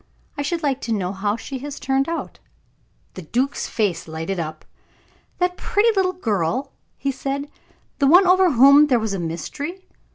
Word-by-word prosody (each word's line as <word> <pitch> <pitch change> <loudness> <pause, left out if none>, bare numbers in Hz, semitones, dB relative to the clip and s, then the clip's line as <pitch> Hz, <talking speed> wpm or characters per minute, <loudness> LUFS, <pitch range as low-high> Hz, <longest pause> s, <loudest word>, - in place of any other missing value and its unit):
I 285 - -3
should 330 +3 -2
like 275 -2 0
to 230 - -4
know 190 -4 -1
how 205 +1 -1
she 265 +3 -6
has 285 +2 -7
turned 270 +2 0
out." 335 - -5 0.7
The 185 - -8
duke's 250 - -1
face 195 -8 -1
lighted 165 +4 -4
up. 155 -1 -6 0.7
"That 360 0 0
pretty 420 +3 +2
little 370 -1 +2
girl," 225 - -1 0.3
he 275 - -1
said; 275 +2 -4 0.5
"the 280 - +3
one 360 +6 +7
over 365 -2 +4
whom 280 +4 +7
there 255 -4 +3
was 220 -2 -2
a 195 - -2
mystery. 280 - -5
270 Hz, 170 wpm, -22 LUFS, 195-300 Hz, 0.7 s, one